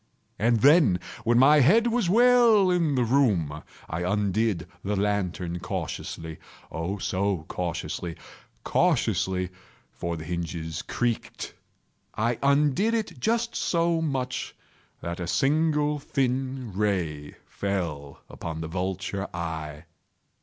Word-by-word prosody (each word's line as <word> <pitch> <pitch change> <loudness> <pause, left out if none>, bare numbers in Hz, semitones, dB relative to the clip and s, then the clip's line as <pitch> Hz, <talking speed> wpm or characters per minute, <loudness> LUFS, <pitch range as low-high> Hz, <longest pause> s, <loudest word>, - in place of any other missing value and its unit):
And 115 0 +2
then, 140 - +6 0.3
when 120 +1 +4
my 145 +4 +7
head 195 - +5
was 235 -6 +1
well 230 -3 +5
in 165 -5 +2
the 125 - +2
room, 105 - +1 0.3
I 80 - -3
undid 100 -1 0 0.2
the 105 +1 -1
lantern 95 -4 -1
cautiously—oh, 80 +2 -5
so 95 -2 -1
cautiously—cautiously 90 +1 -2 0.4
(for 85 -1 -4
the 80 - -7
hinges 85 -1 -4
creaked)—I 120 -1 -4
undid 150 - +3
it 220 -2 -3
just 235 +1 0
so 170 -1 +1
much 130 -5 -2 0.5
that 85 +1 -4
a 85 - -3
single 150 - +2
thin 130 -3 -2
ray 90 -8 -1
fell 85 -8 -4
upon 80 -1 -6
the 80 - -4
vulture 95 +2 -3
eye. 80 -2 -5
105 Hz, 105 wpm, -26 LUFS, -, 0.5 s, my